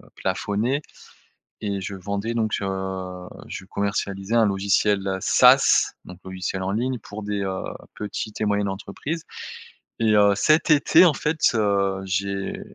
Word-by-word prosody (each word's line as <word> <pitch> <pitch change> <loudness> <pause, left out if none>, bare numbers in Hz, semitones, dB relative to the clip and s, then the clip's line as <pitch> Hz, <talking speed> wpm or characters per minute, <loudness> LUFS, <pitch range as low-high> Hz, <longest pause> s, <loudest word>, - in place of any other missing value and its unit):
plafonnées 105 +8 -1 0.8
et 100 -2 -2
je 95 - -5
vendais 100 +4 -3
donc, 110 -2 -1
heu, 95 -2 -4 0.2
je - - -7
commercialisais 100 +1 -3
un 115 - +5
logiciel 100 0 +1
SaaS, - - +5
donc 90 0 -11
logiciel 95 0 -4
en 95 - -1
ligne 125 +4 -1
pour 105 +1 -9
des, 105 0 -2
heu, 95 -1 -3 0.3
petites 105 +1 -5
et - - +2
moyennes 100 -1 +1
entreprises. 105 - -5 0.8
Et 110 -2 +3
heu, 100 -1 +5
cet 155 +10 +3
été, 155 +4 +6
en 165 - +5
fait, 150 +3 -2 0.2
heu, 100 -3 +1
j'ai 100 +1 -2
100 Hz, 140 wpm, -23 LUFS, 95-110 Hz, 0.8 s, été